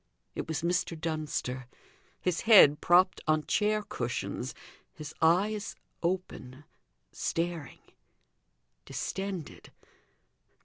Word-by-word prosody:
It - - -5
was 160 -1 -3
Mr. 170 -1 0
Dunster; 150 -6 -3 0.5
his 180 -2 -1
head 195 -10 +7
propped 180 +2 +4
on 155 -1 +2
chair 215 0 +1
cushions, - - -4 0.4
his 155 -3 -8
eyes 200 +6 +2 0.3
open, 170 -7 -3 0.5
staring, 165 -3 -3 1.1
distended. 190 -5 -5
170 Hz, 85 wpm, -30 LUFS, 155-190 Hz, 1.1 s, head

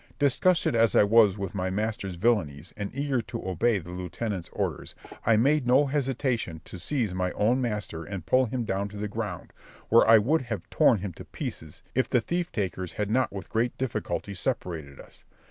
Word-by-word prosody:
Disgusted 155 +5 +2
as 115 -3 +3
I - - +7
was 105 -1 +5
with 100 -2 -4
my 95 -2 -1
master's 100 -1 -2
villanies, 85 -7 0
and 100 -1 -4
eager 140 -3 0
to 115 -3 -7
obey 100 +5 +2
the 90 -1 -8
lieutenant's 90 +1 -4
orders, - - -3 0.3
I 115 -2 +5
made 140 +3 +3
no 130 +4 +5
hesitation 130 - -1
to 90 - -9
seize 115 - -1
my 90 0 -1
own 120 +5 +2
master 105 -8 -3
and 95 -3 -6
pull 130 0 +4
him 125 +1 -2
down 100 0 -1
to 105 - -9
the 105 +1 -2
ground, 105 -4 -5 0.4
where 115 0 +6
I 115 0 +9
would 145 +10 +2
have 115 -8 -5
torn - - +5
him 100 -3 -4
to - - -11
pieces 80 -1 -7
if 130 - +1
the 125 - +3
thief 175 +8 -2
takers 95 -3 -3
had 105 0 -2
not 130 +3 +2
with 100 -3 -7
great 115 +2 0
difficulty 120 -5 -3
separated 85 - -4
us. - - -14
105 Hz, 195 wpm, -27 LUFS, 95-125 Hz, 0.4 s, I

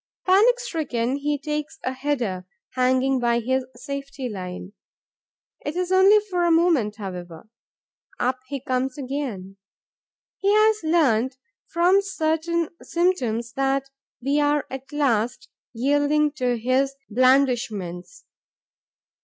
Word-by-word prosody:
Panic 435 +7 +5
stricken, 275 - -2
he 290 +1 -1
takes 300 +1 -4
a 255 - -1
header, 245 -10 -2 0.2
hanging 260 +1 +2
by 235 -1 +2
his 260 +2 -1
safety 280 -1 -6
line. 185 -2 -7 0.9
It 295 - -4
is 360 0 -2
only 380 +3 +6
for 360 -3 0
a 345 - +3
moment, 325 -11 +3
however. 180 -3 -8 0.7
Up 255 +1 0
he 280 0 -4
comes 255 +1 -2
again. 255 -9 -5 0.8
He 395 +1 +2
has 430 0 +4
learnt, 260 -6 +2 0.3
from 355 +4 +3
certain 335 -3 -1
symptoms, 245 -10 0
that 270 +1 0 0.3
we 275 +4 +1
are 290 -1 +2
at 265 +1 -7
last 245 -5 0 0.2
yielding 290 +4 +2
to 250 -4 -1
his 260 +4 +1
blandishments. 240 - +1
270 Hz, 115 wpm, -24 LUFS, 240-315 Hz, 0.9 s, only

